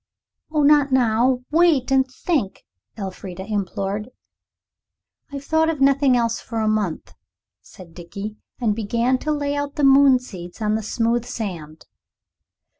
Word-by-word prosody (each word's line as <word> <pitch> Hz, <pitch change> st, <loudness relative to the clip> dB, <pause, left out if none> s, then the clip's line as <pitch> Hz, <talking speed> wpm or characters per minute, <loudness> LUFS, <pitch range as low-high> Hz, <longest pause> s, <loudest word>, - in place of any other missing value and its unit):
"Oh, 305 Hz, -2 st, +1 dB
not 290 Hz, -1 st, +4 dB
now; 250 Hz, 0 st, +2 dB
wait 315 Hz, -5 st, +3 dB
and 265 Hz, 0 st, +3 dB
think," 260 Hz, -, -3 dB, 0.3 s
Elfrida 190 Hz, -2 st, -7 dB
implored. 205 Hz, +1 st, -3 dB, 1.2 s
"I've 280 Hz, -1 st, -6 dB
thought 320 Hz, +2 st, +2 dB
of 320 Hz, -3 st, -2 dB
nothing 275 Hz, -1 st, +4 dB
else 230 Hz, -1 st, 0 dB
for 230 Hz, -, -7 dB
a 220 Hz, -, 0 dB
month," 210 Hz, -6 st, -2 dB, 0.5 s
said 175 Hz, -3 st, -15 dB
Dickie, 200 Hz, +5 st, -8 dB, 0.2 s
and 220 Hz, -4 st, 0 dB
began 235 Hz, +4 st, 0 dB
to 305 Hz, -, -2 dB
lay 285 Hz, -1 st, -1 dB
out 285 Hz, 0 st, -3 dB
the 295 Hz, -, -2 dB
moon 275 Hz, -1 st, +6 dB
seeds 180 Hz, -8 st, -10 dB
on 215 Hz, -1 st, 0 dB
the 220 Hz, -, 0 dB
smooth 230 Hz, +2 st, 0 dB
sand. 165 Hz, -10 st, -6 dB
235 Hz, 140 wpm, -22 LUFS, 205-275 Hz, 1.2 s, moon